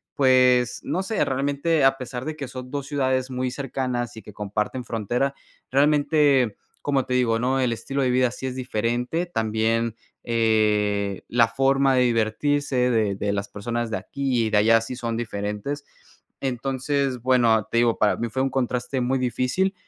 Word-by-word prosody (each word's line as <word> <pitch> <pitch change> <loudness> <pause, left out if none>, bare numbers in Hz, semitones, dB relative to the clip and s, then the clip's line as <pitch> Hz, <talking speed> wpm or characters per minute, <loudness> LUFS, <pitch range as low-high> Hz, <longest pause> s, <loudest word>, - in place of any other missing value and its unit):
pues, 125 -2 +4
no 185 - -1
sé, 215 +2 0
realmente, 140 +3 0
a 135 0 +4
pesar 125 -1 -6
de 155 0 -4
que 140 -3 -6
son 125 0 -8
2 140 0 -4
ciudades 130 -3 0
muy 130 0 -1
cercanas 125 -2 -3
y - - -7
que 105 - -12
comparten 105 +5 -3
frontera, 120 +5 -1 0.4
realmente, 145 -4 +3 0.3
como 140 -2 +1
te 125 - -3
digo, 115 -3 +2
¿no? 130 +3 +1
El 125 -2 +1
estilo 135 +5 -3
de 125 - +2
vida 125 0 +3
sí 125 - -8
es 130 -1 -3
diferente, 125 +6 -1
también, 115 -5 0 0.3
eh, 105 -3 +1
la 115 -1 +4
forma 135 +3 +2
de 130 - +4
divertirse 125 +3 +1
de 110 -4 +1
de 100 +1 -1
las 100 0 -3
personas 120 +2 -3
de 110 - -2
aquí 130 -4 -1
y - - 0
de 105 - +3
allá 115 +2 +5
sí 115 +3 -6
son 115 -2 -3
diferentes. 105 +5 -4 0.6
Entonces, 135 0 -1
bueno, 120 -3 +3
te 115 - 0
digo, 120 -1 +3
para 105 -3 +2
mí 120 - -2
fue 130 +4 -2
un 135 - +1
contraste 125 0 -1
muy 130 +2 +1
difícil, 130 +9 0
125 Hz, 175 wpm, -24 LUFS, 115-135 Hz, 0.6 s, allá